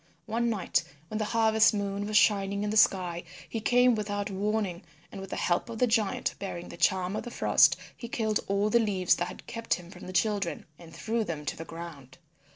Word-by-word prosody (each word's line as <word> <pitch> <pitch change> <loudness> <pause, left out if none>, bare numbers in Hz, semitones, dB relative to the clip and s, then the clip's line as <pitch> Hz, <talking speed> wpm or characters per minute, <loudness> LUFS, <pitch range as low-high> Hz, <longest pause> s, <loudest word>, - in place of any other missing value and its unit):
One 235 +2 0
night 200 -6 0 0.3
when 215 - -3
the 215 - 0
harvest 220 0 +4
moon 200 0 -2
was 215 0 +2
shining 200 -1 +3
in 210 - -1
the - - -2
sky 180 -5 +3 0.2
he 225 - -4
came 245 +2 +4
without 205 -2 -2
warning, 200 -2 -1 0.3
and 195 - -7
with 195 - -8
the - - -4
help 175 +6 0
of 230 - -6
the 250 - +4
giant 225 -4 0
bearing 175 -3 -6
the - - -8
Charm 180 +2 +1
of - - -2
the 240 - -7
Frost - - +4 0.2
he 235 - -8
killed 220 -2 0
all 200 +2 +1
the 235 - +5
leaves 195 -5 +2
that 175 - -1
had 180 - -10
kept 230 -1 -1
him 175 0 -11
from - - -11
the - - -6
children, 200 -2 0
and 165 -2 -13
threw 225 +5 -2
them 155 -6 -5
to - - -2
the 165 - -8
ground. 155 -7 -9
205 Hz, 220 wpm, -29 LUFS, 180-220 Hz, 0.3 s, the